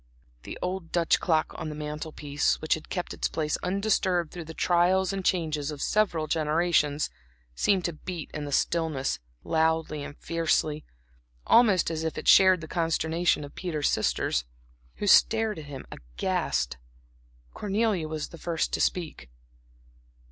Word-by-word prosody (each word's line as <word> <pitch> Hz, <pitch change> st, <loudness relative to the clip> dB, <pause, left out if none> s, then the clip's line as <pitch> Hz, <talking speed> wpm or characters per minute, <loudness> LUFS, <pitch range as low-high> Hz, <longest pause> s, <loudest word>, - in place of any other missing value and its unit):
The -, -, -8 dB
old 180 Hz, -2 st, -4 dB
Dutch 170 Hz, -2 st, +2 dB
clock 160 Hz, -3 st, +1 dB
on 160 Hz, -2 st, -4 dB
the 150 Hz, -, -6 dB
mantel 150 Hz, +1 st, -5 dB
piece, 145 Hz, 0 st, 0 dB
which 155 Hz, -, +1 dB
had 160 Hz, -, -5 dB
kept 180 Hz, -2 st, -3 dB
its -, -, -1 dB
place 155 Hz, -1 st, -1 dB
undisturbed 185 Hz, -3 st, 0 dB
through 175 Hz, -2 st, -7 dB
the 160 Hz, +1 st, -9 dB
trials 180 Hz, +2 st, +2 dB
and 195 Hz, -1 st, -3 dB
changes 155 Hz, -5 st, 0 dB
of 150 Hz, -2 st, -6 dB
several 175 Hz, -4 st, +1 dB
generations, 155 Hz, -1 st, +1 dB, 0.4 s
seemed 190 Hz, -, +1 dB
to 175 Hz, -, -1 dB
beat 165 Hz, +1 st, -7 dB
in 150 Hz, -1 st, -4 dB
the 145 Hz, -, -6 dB
stillness 155 Hz, -2 st, 0 dB, 0.2 s
loudly 160 Hz, -1 st, 0 dB
and 145 Hz, -, -9 dB
fiercely, 155 Hz, -2 st, 0 dB, 0.6 s
almost 205 Hz, -8 st, +4 dB
as 160 Hz, 0 st, -3 dB
if 160 Hz, -, -3 dB
it -, -, -5 dB
shared 185 Hz, -2 st, +7 dB
the 155 Hz, -, -7 dB
consternation 165 Hz, -1 st, 0 dB
of 145 Hz, -, -9 dB
Peter's 155 Hz, -5 st, -1 dB
sisters, 60 Hz, -, 0 dB, 0.5 s
who -, -, -4 dB
stared 220 Hz, -1 st, +4 dB
at 155 Hz, -, -9 dB
him 140 Hz, -2 st, -8 dB
aghast. -, -, -2 dB, 0.8 s
Cornelia 205 Hz, -4 st, 0 dB
was 155 Hz, -1 st, -4 dB
the 170 Hz, -, -12 dB
first 165 Hz, 0 st, -2 dB
to -, -, 0 dB
speak. 160 Hz, -, -2 dB
160 Hz, 155 wpm, -27 LUFS, 150-180 Hz, 0.8 s, shared